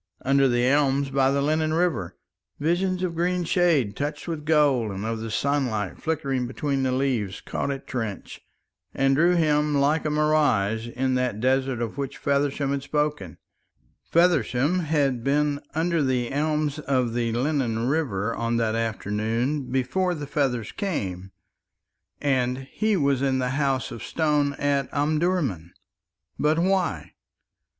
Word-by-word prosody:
"Under 135 +1 +4
the 120 -1 +2
elms 140 0 +2
by 135 -1 +3
the 140 0 +1
Lennon 155 +1 +1
River 160 - -1 0.2
" 95 - -50
Visions 180 +4 0
of 180 -2 -1
green 175 +2 0
shade 160 - +2
touched 145 +2 -4
with 160 -3 -4
gold, 145 -7 +3
and 100 +1 -5
of 115 0 -2
the 115 0 -5
sunlight 120 -6 -1
flickering 140 -6 -1
between 135 +2 -2
the 130 -1 +1
leaves, 125 -7 -1
caught - - -3
at 140 -1 -4
Trench 110 -6 -5 0.5
and 135 0 +3
drew 170 +5 +4
him 150 -2 +2
like 145 +3 +2
a 155 - -1
mirage 145 -8 +2
in 130 +2 -1
that 125 -4 0
desert 130 0 +1
of 115 +4 -5
which 140 -1 -4
Feversham 140 0 0
had 140 0 -1
spoken. 150 - -2 0.7
Feversham 165 -2 +2
had 145 -7 0
been 145 +1 +1
under 165 0 +1
the 125 -3 0
elms 150 +1 0
of 130 -5 0
the 120 -1 0
Lennon 120 -3 0
River 115 -8 0
on 115 0 -1
that 115 -2 +1
afternoon 115 +5 -2
before 175 +8 0
the 150 -2 -5
feathers 130 -6 -1
came, 95 - -4 0.9
and 130 -2 0
he 215 -2 +1
was 140 -4 +1
in 135 -1 +1
the 125 -1 0
House 135 -3 0
of 115 - -7
Stone 150 -3 +1
at 140 -2 0
Omdurman. 145 - 0 0.7
But 150 +1 +2
why? 190 +2 0
140 Hz, 150 wpm, -25 LUFS, 120-150 Hz, 0.9 s, Under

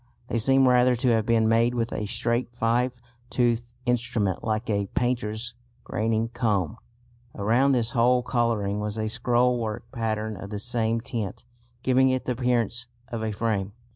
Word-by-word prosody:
They 115 - 0
seem 135 +3 +5
rather 125 0 +5
to 125 +2 +1
have 110 -2 +2
been 115 -1 +3
made 115 +2 +3
with 115 -1 -1
a 105 - -3
straight 120 +3 -1
five 120 +2 0 0.3
toothed 120 -1 0
instrument 115 -6 0
like 110 +1 -1
a 100 -2 0
painter's 120 -2 -1 0.3
graining 110 +1 -1
comb. 105 -5 0 0.6
Around 120 +7 +3
this 120 -2 +1
whole 125 0 +3
colouring 115 -5 0
was 105 +1 -3
a 110 0 -1
scrollwork 120 -2 +1
pattern 110 -2 -2
of 100 +2 -8
the 105 - -4
same 115 0 0
tint, 110 -6 -5 0.4
giving 130 +1 +4
it 130 0 -1
the - - -1
appearance 120 -1 0 0.2
of 115 -2 -4
a 110 - -1
frame. 100 -2 -1
115 Hz, 160 wpm, -26 LUFS, 110-125 Hz, 0.6 s, seem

